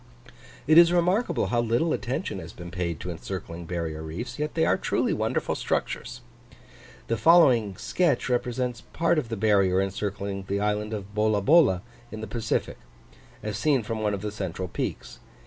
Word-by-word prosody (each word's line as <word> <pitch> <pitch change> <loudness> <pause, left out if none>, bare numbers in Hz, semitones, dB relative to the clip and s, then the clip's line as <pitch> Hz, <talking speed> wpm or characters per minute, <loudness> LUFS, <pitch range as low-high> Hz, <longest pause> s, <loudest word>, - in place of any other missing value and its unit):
It 155 +3 +7
is 170 0 +7
remarkable 180 +6 +2
how 120 - +3
little 120 +8 +1
attention - - -3
has - - -9
been 85 0 -9
paid 85 -3 -3
to - - -4
encircling 85 0 -6
barrier 80 -3 -3
reefs; 115 - -6
yet 150 0 -2
they 160 - +3
are - - +3
truly - - 0
wonderful - - -1
structures. 120 - -3 0.8
The 115 - -1
following 120 - +5
sketch 170 -8 +1
represents 125 -1 -1
part 170 0 +2
of 120 - -5
the 115 - -3
barrier 100 -3 +3
encircling 100 0 -3
the 100 +1 -1
island 105 +1 -1
of 105 -2 -6
Bolabola 105 - +4 0.3
in 110 - -6
the 110 - -4
Pacific, 110 +1 -2 0.6
as 105 -1 -3
seen 140 -6 +2
from 110 0 -4
one 105 -1 +1
of 100 - -8
the 105 - -2
central 95 -2 -4
peaks. - - -5
110 Hz, 165 wpm, -26 LUFS, 95-125 Hz, 0.8 s, It